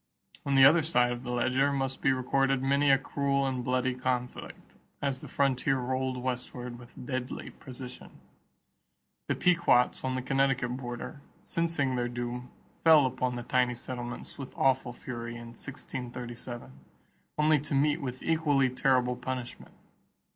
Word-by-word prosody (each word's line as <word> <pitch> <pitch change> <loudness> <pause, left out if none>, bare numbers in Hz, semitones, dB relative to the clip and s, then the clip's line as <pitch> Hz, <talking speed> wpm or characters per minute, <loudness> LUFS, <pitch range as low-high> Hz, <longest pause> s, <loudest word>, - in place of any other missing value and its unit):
On 140 - +2
the 135 -1 +9
other 160 +4 +7
side 125 -6 +2
of 120 0 -4
the 125 - -3
ledger 130 +3 +2
must 135 -1 -2
be 135 - +4
recorded 135 +1 +1
many 140 +1 +3
a 135 - +7
cruel 140 0 0
and 130 -2 -1
bloody 125 +1 +1
conflict 125 -1 -4 0.2
as 140 -2 -2
the - - -8
frontier 135 -1 +1
rolled 130 0 -1
westward 125 -1 -4
with 125 +1 -12
deadly 130 -1 -4
precision. 125 -1 -10 1.2
The - - +1
Pequots 170 -8 +3
on 130 0 -1
the 130 - -2
Connecticut 135 -2 +1
border, 125 +3 -6 0.2
sensing 165 -6 0
their 120 -1 0
doom, 120 +1 -4 0.3
fell 160 -4 +7
upon 125 -1 -1
the 120 - -4
tiny 125 0 +2
settlements 120 +1 -6
with 135 -2 -8
awful 130 -2 +2
fury 120 -1 -6
in 120 0 -8
1637 120 - -7 0.7
only 150 0 +4
to 145 0 -3
meet 150 +3 +2
with 130 -2 -5
equally 145 -5 +2
terrible 130 -1 +2
punishment. 125 0 -6
130 Hz, 145 wpm, -29 LUFS, 125-135 Hz, 1.2 s, the